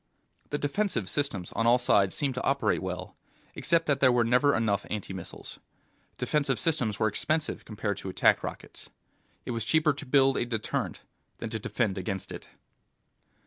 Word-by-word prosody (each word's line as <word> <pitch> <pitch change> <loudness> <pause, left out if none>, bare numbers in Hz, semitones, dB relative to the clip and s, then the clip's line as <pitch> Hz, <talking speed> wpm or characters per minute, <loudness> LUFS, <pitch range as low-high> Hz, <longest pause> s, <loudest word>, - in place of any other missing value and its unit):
The 145 - -1
defensive 145 - -1
systems 105 -11 -2
on 115 - 0
all 120 +1 +6
sides 100 -6 +3
seemed 140 -3 0
to 125 - -4
operate 140 0 +1
well, 90 0 -5 0.4
except 165 -1 +1
that 140 -2 +1
there 130 -2 +6
were 120 -1 +3
never 125 +5 +3
enough 105 -3 +1
anti 105 -2 -4
missiles. 95 -2 -9 0.6
Defensive 140 -4 0
systems 125 -9 +1
were 110 - +3
expensive 155 +9 -1
compared 105 -2 -3
to 95 - -6
attack 95 - +3
rockets. - - -7 0.6
It - - -3
was 115 -2 -1
cheaper 155 +2 +3
to 140 - -8
build 135 0 +4
a - - +1
deterrent 115 -3 -3 0.3
than - - -6
to - - -2
defend 100 -4 -1
against 95 +1 -3
it. - - -8
120 Hz, 170 wpm, -28 LUFS, 100-145 Hz, 0.6 s, all